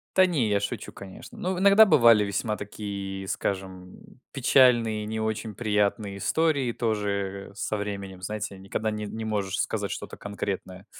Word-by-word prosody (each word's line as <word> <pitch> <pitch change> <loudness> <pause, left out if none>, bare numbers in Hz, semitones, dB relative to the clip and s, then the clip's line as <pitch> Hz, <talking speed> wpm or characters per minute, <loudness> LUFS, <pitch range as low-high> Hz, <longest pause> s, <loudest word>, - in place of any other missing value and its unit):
Та 185 0 +7
не, 140 -11 +1
я 100 -1 +1
шучу, - - -4
конечно. 95 -1 -11
Ну, 185 0 -2
иногда 200 +3 +7
бывали 115 - +6
весьма 100 +2 -1
такие, 100 -2 -6
скажем, 95 -2 -4
м, 130 - -19
печальные, 120 -5 +4
не 110 +1 -3
очень 110 0 -2
приятные 105 -2 0
истории 145 -5 +1
тоже, 100 -4 -2
э, - - -18
со 105 - -3
временем, 100 -2 -5
знаете, 105 0 -4
никогда 100 +3 -3
не 105 0 -4
не 110 +1 -5
можешь 100 -3 -2
сказать - - -1
что-то - - -6
конкретное. 100 -1 -5
105 Hz, 160 wpm, -26 LUFS, 100-115 Hz, -, Та